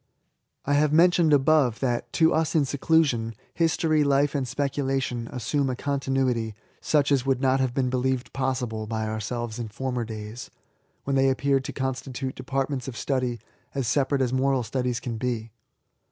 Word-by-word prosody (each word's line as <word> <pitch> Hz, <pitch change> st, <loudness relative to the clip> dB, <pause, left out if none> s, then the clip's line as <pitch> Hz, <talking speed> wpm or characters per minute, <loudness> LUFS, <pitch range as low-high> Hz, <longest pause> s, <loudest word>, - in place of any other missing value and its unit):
I 145 Hz, -, +1 dB
have 145 Hz, +1 st, +3 dB
mentioned 170 Hz, 0 st, +5 dB
above, 140 Hz, -4 st, +4 dB
that, 120 Hz, -3 st, -1 dB
to 160 Hz, -1 st, +4 dB
us 160 Hz, +1 st, 0 dB
in 150 Hz, -3 st, +4 dB
sedusion. 135 Hz, -6 st, +1 dB, 0.2 s
History, 160 Hz, -2 st, +2 dB
Life, 140 Hz, 0 st, +2 dB
and 135 Hz, -3 st, -1 dB
Speculation, 135 Hz, -3 st, -1 dB
assume 130 Hz, +3 st, -1 dB
a 130 Hz, -, -1 dB
continuity 135 Hz, -5 st, -1 dB, 0.2 s
such 145 Hz, -2 st, +2 dB
as 135 Hz, -3 st, +3 dB
would 135 Hz, -1 st, +1 dB
not 135 Hz, 0 st, +2 dB
have 130 Hz, -1 st, 0 dB
been 130 Hz, -2 st, +1 dB
believed 130 Hz, 0 st, -1 dB
possible 125 Hz, -5 st, -2 dB
by 110 Hz, 0 st, -2 dB
ourselves 110 Hz, +2 st, -4 dB
in 115 Hz, -, -3 dB
fonner 125 Hz, +2 st, -3 dB
days, 110 Hz, +1 st, -7 dB, 0.5 s
when 140 Hz, -, -1 dB
they 135 Hz, 0 st, +4 dB
appeared 135 Hz, 0 st, +1 dB
to -, -, -4 dB
constitute 130 Hz, 0 st, -3 dB
departments 135 Hz, -1 st, -3 dB
of 130 Hz, -, -6 dB
study 125 Hz, -4 st, -1 dB, 0.4 s
as 135 Hz, -4 st, -1 dB
separate 140 Hz, +1 st, +1 dB
as 125 Hz, -1 st, -1 dB
moral 130 Hz, -1 st, +2 dB
studies 125 Hz, 0 st, -1 dB
can 120 Hz, -2 st, -4 dB
be. 115 Hz, -2 st, -2 dB
130 Hz, 165 wpm, -26 LUFS, 120-140 Hz, 0.5 s, mentioned